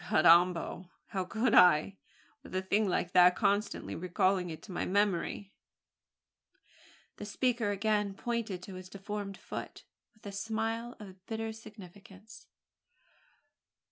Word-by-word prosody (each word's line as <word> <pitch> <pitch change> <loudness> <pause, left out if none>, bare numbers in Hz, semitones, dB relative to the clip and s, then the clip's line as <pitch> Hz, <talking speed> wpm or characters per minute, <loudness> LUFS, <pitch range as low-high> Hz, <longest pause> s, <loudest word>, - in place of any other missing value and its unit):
Carrambo! 175 +2 +4 0.2
how 190 -2 -2
could 220 +5 0
I, 180 +2 +5 0.4
with - - -10
a 185 - +1
thing 205 +3 +1
like 180 -1 -1
that 180 -1 +6
constantly 205 0 0
recalling 180 +1 0
it 160 - -8
to 200 - -10
my 175 - -2
memory?" 200 0 0 1.6
The 210 - -7
speaker 230 0 0
again 205 0 0
pointed 220 -5 -3
to 195 - -9
his 185 0 -9
deformed 200 0 -6
foot - - -8 0.3
with 215 - -24
a 200 - -5
smile 225 +3 -3
of 190 -3 -12
bitter 225 0 -3
significance. 210 -1 -14
200 Hz, 125 wpm, -31 LUFS, 185-220 Hz, 1.6 s, that